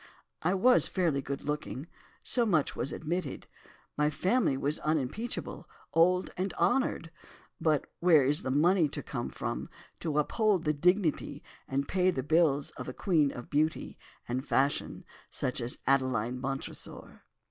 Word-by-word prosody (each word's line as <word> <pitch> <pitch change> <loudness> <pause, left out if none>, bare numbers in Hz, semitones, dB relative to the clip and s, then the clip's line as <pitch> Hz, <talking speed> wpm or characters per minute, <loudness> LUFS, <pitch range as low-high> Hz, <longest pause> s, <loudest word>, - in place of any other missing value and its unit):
I 180 +4 +1
was 250 +6 +5
fairly 165 -7 0
good 140 +1 -5
looking—so 150 - -3
much 170 -10 +1
was 135 - -1
admitted—my 150 -2 -4
family 185 - +1
was 145 +3 -1
unimpeachable, 155 - -3 0.2
old 180 +3 +3
and 190 +2 -3
honoured, 250 - +1 0.5
but 155 -3 +2
where 165 -6 +5
is 145 +3 +3
the - - -3
money 160 +4 +3
to - - -5
come 120 -4 -4
from 120 0 -4 0.3
to 155 -3 -2
uphold 200 +4 +2
the 150 - +1
dignity 180 +2 +1 0.2
and 140 +1 -1
pay 185 -1 +2
the 135 -8 -1
bills 150 -2 +2
of 125 - -7
a - - -5
queen 155 -6 +2
of 120 - -9
beauty 155 +2 0 0.3
and 130 +4 -3
fashion 140 +2 0 0.2
such 125 0 -2
as 120 +1 -3
Adeline 130 -3 +1
Montresor? 135 +1 -6
150 Hz, 140 wpm, -30 LUFS, 135-180 Hz, 0.5 s, was